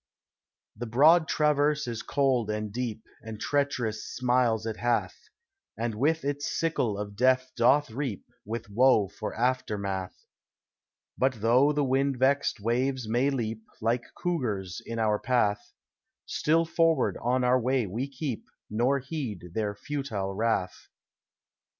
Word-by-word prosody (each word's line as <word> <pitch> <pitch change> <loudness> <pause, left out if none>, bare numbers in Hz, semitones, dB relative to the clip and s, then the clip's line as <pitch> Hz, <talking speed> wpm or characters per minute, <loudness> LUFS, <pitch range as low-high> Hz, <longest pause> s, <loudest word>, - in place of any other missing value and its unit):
The 120 +3 -5
broad 155 +8 +5
traverse 150 0 +2
is 115 -2 -4
cold 130 -6 +1
and 105 -1 -3
deep, 115 -3 -3 0.2
And 110 -1 -8
treacherous 125 -7 -1
smiles 120 -3 +1
it 110 -1 -3
hath, 120 -1 0 0.6
And 115 0 -2
with 150 +8 0
its 145 0 -2
sickle 130 -11 0
of 100 0 -5
death 130 +2 +2
doth 125 +3 +3
reap, 125 -4 -4 0.2
With 115 +2 -5
woe 105 -2 +4
for 105 +2 -6
aftermath; 100 -6 -2 0.9
But 130 -4 +1
though 125 +6 +4
the 150 -1 +1
wind 135 0 +1
vext 135 0 +2
waves 125 +3 0
may 120 +5 +2
leap, 115 -5 -3 0.2
Like 115 +2 0
cougars, 110 - -2
in 115 - -6
our 105 -2 +1
path, 110 -5 0 0.5
Still 165 +2 +1
forward 165 0 +2
on 125 +2 +1
our 125 +1 +4
way 125 0 +1
we 115 +9 -3
keep, 135 -3 -4 0.3
Nor 120 +6 +2
heed 125 - -5
their 105 -1 -1
futile 110 -8 -4
wrath. 105 -3 -1
120 Hz, 135 wpm, -28 LUFS, 110-140 Hz, 0.9 s, broad